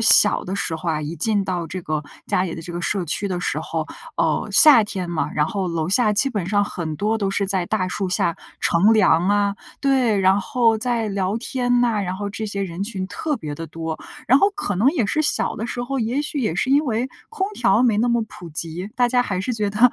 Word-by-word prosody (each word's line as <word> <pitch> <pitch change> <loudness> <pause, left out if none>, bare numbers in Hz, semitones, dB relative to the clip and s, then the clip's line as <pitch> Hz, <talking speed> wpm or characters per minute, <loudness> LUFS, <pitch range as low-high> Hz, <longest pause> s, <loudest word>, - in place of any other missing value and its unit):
小 215 -1 +7
的 185 - -4
时 165 -4 -1
候 170 +2 -5
啊， 155 -1 -1
一 155 +3 -5
进 205 +4 +1
到 180 -3 -3
这 185 +3 -6
个 155 -2 -2 0.2
家 180 - +1
里 180 -3 -3
的 165 - -7
这 175 - -8
个 175 - -4
社 195 0 -1
区 180 +5 -2
的 180 -2 -3
时 - - -1
候， - - -4 0.3
呃， - - 0
夏 280 -9 +9
天 185 -4 -4
嘛， 170 -2 -2
然 150 0 +1
后 195 -1 -3
楼 165 -1 -2
下 210 +2 +4
基 215 +7 +3
本 205 -8 -3
上 205 +1 +2
很 160 -6 -5
多 215 +2 0
都 200 -2 -1
是 195 0 -1
在 190 -3 -1
大 185 -3 -1
树 190 0 -3
下 170 -2 0 0.2
乘 190 +6 +3
凉 185 -5 +3
啊。 205 0 +2 0.3
对， 260 -6 +2
然 190 +1 +3
后 230 +3 +2
在 230 -1 -1
聊 195 +1 -1
天 245 0 0
呐， 235 -4 +1
然 185 -2 -3
后 205 +1 -4
这 220 +2 -5
些 200 -1 -3
人 180 0 -4
群 200 -3 -4
特 295 +8 -3
别 150 -8 -6
地 165 +2 -7
多， 160 0 -5 0.3
然 260 - +5
后 400 - +3
可 300 - -2
能 220 +8 +3
也 290 -8 0
是 310 +9 0
小 - - +1
的 225 - -4
时 245 0 -4
候， 270 +2 -3
也 240 +5 -1
许 300 0 -3
也 220 -11 -1
是 245 +9 -1
因 290 +2 +4
为 240 +1 -1 0.2
空 390 -4 -2
调 240 -1 +2
没 225 -4 +2
那 240 +2 +2
么 235 -1 +1
普 175 -5 -11
及， 165 +4 -4
大 245 -1 +3
家 245 0 +2
还 185 -6 -3
是 225 +7 -2
觉 210 -3 -1
得 235 +4 +4
205 Hz, 265 characters per minute, -21 LUFS, 180-240 Hz, 0.3 s, 夏